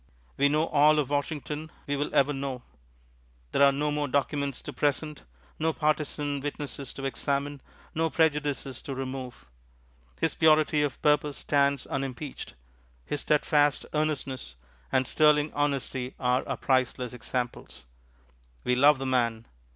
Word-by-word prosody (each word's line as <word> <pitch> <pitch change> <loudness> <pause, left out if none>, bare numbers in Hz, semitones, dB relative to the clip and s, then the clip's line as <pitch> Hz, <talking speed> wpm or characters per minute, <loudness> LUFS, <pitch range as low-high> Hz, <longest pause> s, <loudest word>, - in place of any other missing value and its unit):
We 140 +1 +3
know 155 +2 +2
all 150 0 +4
of 145 -2 0
Washington 150 +1 -2 0.2
we 145 - -1
will 145 +1 -1
ever 140 +1 +3
know; 135 -3 -4 0.9
there - - +1
are 140 0 +8
no 150 +2 -1
more 145 0 -1
documents 140 0 -1
to - - -7
present, 150 +1 -1 0.4
no 160 +1 +1
partisan 150 -2 -1
witnesses 140 -1 -5
to 135 - -5
examine, 140 +1 -2 0.3
no 165 +1 +1
prejudices 145 -5 0
to 135 - -5
remove. 130 - -6 0.7
His - - +1
purity 155 -1 +4
of 145 -3 -1
purpose 150 -1 +2
stands 140 -2 +1
unimpeached; 135 - -5 0.5
his 145 - -3
steadfast 150 -1 +2
earnestness 140 - -2 0.4
and 130 - +2
sterling 150 +1 +3
honesty 135 -3 -1
are 125 0 +1
our - - -2
priceless 130 -2 0
examples. 125 0 -4 0.8
We 125 - +1
love 145 +3 +6
the 135 - -4
man. 115 -3 0
140 Hz, 135 wpm, -28 LUFS, 130-150 Hz, 0.9 s, are